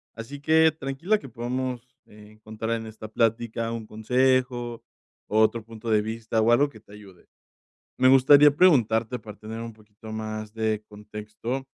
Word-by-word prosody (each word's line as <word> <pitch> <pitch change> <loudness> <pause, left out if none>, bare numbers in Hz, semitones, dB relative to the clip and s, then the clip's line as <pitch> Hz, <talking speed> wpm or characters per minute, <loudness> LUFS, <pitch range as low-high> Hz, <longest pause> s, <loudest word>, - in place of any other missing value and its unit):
Así 125 +5 -8
que, 160 +1 +4
tranquila. 160 +8 -1
Que 135 - -11
podamos, 125 +1 -5
eh, 105 0 -16
encontrar 110 +1 -6
en 110 0 -7
esta 110 0 -9
plática, 115 0 -1
un 115 -2 -6
consejo, 125 +1 0 0.4
o 110 - +1
otro 110 +1 +2
punto 115 0 -8
de 105 -1 +3
vista, 110 +1 -2
o 115 +2 +3
algo 140 +5 +4
que 110 -6 -15
te 100 - -21
ayude. 100 -4 -15 0.7
Me 130 - +5
gustaría 140 +2 +7
preguntarte, 120 - +3
para 105 -2 -12
tener 110 +1 -7
un 115 0 -6
poquito 110 0 -14
más 110 -1 -5
de 110 -1 -1
contexto. 105 +5 -6
115 Hz, 165 wpm, -25 LUFS, 110-130 Hz, 0.7 s, gustaría